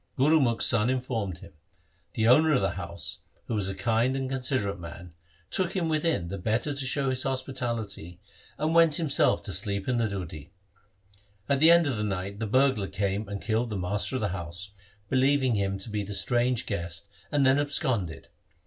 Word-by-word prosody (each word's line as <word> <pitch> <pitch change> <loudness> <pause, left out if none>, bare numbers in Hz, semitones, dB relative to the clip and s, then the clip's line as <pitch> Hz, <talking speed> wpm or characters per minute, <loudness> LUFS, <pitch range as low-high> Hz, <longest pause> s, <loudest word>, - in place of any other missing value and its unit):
Gurumukh's 135 -4 +4
son 115 -1 +4
informed 120 -8 -2
him. - - -13 0.6
The 110 0 +1
owner 155 +6 +5
of 130 - +2
the 95 -2 +1
house, - - -5 0.3
who - - -4
was 105 -3 0
a 95 - -4
kind 115 +4 +1
and 135 -1 -2
considerate 125 -7 -1
man, 85 0 -10 0.4
took 185 0 0
him 170 -4 0
within, 155 - 0
the 100 +1 -5
better 115 - -1
to 140 -1 -1
show 135 0 +1
his 130 0 +3
hospitality, 115 -10 -3 0.4
and 155 +2 0
went 165 -3 +5
himself 155 -4 +3
to - - -3
sleep 100 -1 -2
in 125 -2 +1
the 115 -1 +1
deudhi. 85 -6 -6 1.0
At 140 - +1
the 160 +3 +7
end 170 0 +6
of 130 -5 -1
the 105 - -2
night 100 0 -4
the 115 - -2
burglar 130 -3 +2
came 100 +1 -2
and 100 -1 -6
killed 115 +2 0
the 105 - -3
master 100 +7 0
of 130 - -1
the 105 - 0
house, 90 +2 -5 0.4
believing 130 0 +2
him 100 -2 -1
to 95 +4 -5
be 105 0 -1
the 100 0 -3
strange 120 +2 +2
guest, 85 -2 -3 0.2
and 145 -2 +2
then 135 +2 +4
absconded. 130 - -1
115 Hz, 190 wpm, -27 LUFS, 100-135 Hz, 1.0 s, the